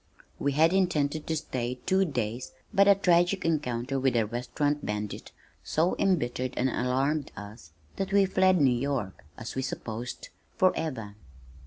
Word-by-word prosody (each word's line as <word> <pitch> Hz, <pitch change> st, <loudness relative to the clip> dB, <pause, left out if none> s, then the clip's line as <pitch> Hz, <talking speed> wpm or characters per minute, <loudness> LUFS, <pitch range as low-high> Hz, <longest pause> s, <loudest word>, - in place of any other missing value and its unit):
We 140 Hz, 0 st, 0 dB
had 160 Hz, +5 st, +4 dB
intended 155 Hz, -5 st, +1 dB
to 160 Hz, -, 0 dB
stay 125 Hz, -4 st, -3 dB
two 190 Hz, +1 st, +3 dB
days 120 Hz, -, -3 dB, 0.2 s
but 200 Hz, -1 st, +5 dB
a 200 Hz, -, +7 dB
tragic 180 Hz, 0 st, +2 dB
encounter 135 Hz, -4 st, -1 dB
with 130 Hz, -2 st, +1 dB
a 115 Hz, -2 st, +3 dB
restaurant 145 Hz, +6 st, -2 dB
bandit 105 Hz, 0 st, -4 dB, 0.3 s
so 165 Hz, +4 st, +1 dB
embittered 130 Hz, -9 st, 0 dB
and 130 Hz, -, +2 dB
alarmed 135 Hz, +5 st, 0 dB
us 105 Hz, -6 st, -10 dB, 0.3 s
that 195 Hz, 0 st, -2 dB
we 200 Hz, 0 st, +5 dB
fled 185 Hz, -1 st, +3 dB
New 135 Hz, -3 st, +5 dB
York 120 Hz, -6 st, -3 dB
(as 115 Hz, -, -6 dB
we 130 Hz, -, -2 dB
supposed), 120 Hz, -2 st, -5 dB, 0.3 s
forever. 130 Hz, -, 0 dB
140 Hz, 150 wpm, -28 LUFS, 120-170 Hz, 0.3 s, a